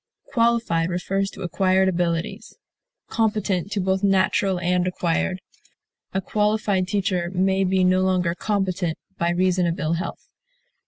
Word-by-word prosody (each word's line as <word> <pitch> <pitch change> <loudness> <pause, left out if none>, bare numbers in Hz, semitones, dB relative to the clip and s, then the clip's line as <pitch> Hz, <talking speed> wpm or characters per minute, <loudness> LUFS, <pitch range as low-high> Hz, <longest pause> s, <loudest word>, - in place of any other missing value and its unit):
Qualified 230 -8 +2
refers 195 +2 -1
to - - -9
acquired 190 +1 +2
abilities; 170 -2 -2 0.5
competent 210 -4 0
to 205 - -1
both 190 0 0
natural 190 -1 +2
and 180 +1 +1
acquired; 180 +1 -1 0.7
a 190 - 0
qualified 210 -2 0
teacher 185 -3 0
may 190 +1 +2
be 190 0 +2
no 185 0 +3
longer 185 -2 +1
competent, 185 -4 -1 0.2
by 170 - +1
reason 180 0 +2
of 170 - -1
ill 155 +2 0
health. 170 +2 -5
185 Hz, 130 wpm, -23 LUFS, 175-195 Hz, 0.7 s, no